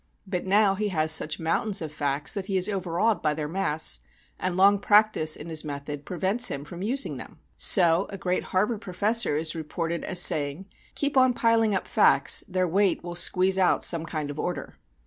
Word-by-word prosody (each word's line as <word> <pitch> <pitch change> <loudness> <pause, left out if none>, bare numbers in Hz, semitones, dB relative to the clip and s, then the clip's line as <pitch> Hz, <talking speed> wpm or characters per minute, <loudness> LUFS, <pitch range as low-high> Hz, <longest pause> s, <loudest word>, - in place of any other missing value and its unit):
But 185 -1 -4
now 200 0 +3
he 210 +2 -2
has 160 -5 0
such 155 0 +1
mountains 195 +5 -1
of 160 -3 -5
facts 145 -1 -2
that 200 -2 -5
he 195 - -1
is 185 +1 +2
overawed 195 +2 -1
by 150 -1 0
their 150 -1 -4
mass, 155 - -1 0.4
and 185 -1 -2
long 200 +1 +4
practice 205 -7 +3
in 150 - -9
his 160 -2 -2
method 145 -1 -7
prevents 190 +7 0
him 140 0 -4
from 175 +3 -10
using 255 +7 -1
them. - - -11 0.2
So 175 -1 +4
a 195 - -7
great 180 0 -2
Harvard 210 +3 -1
professor 205 -1 0
is 155 +1 0
reported 165 +1 -4
as 180 - 0
saying, 150 +2 +2 0.3
"Keep 285 -1 -2
on 255 -1 +4
piling 225 -3 +2
up 190 - -3
facts, - - +3
their 185 -2 -1
weight 195 +2 +1
will 175 0 -6
squeeze 185 +2 +2
out 185 - +2
some 165 -1 0
kind 155 -3 -4
of 145 - -9
order." 180 - -5
180 Hz, 195 wpm, -25 LUFS, 160-200 Hz, 0.4 s, long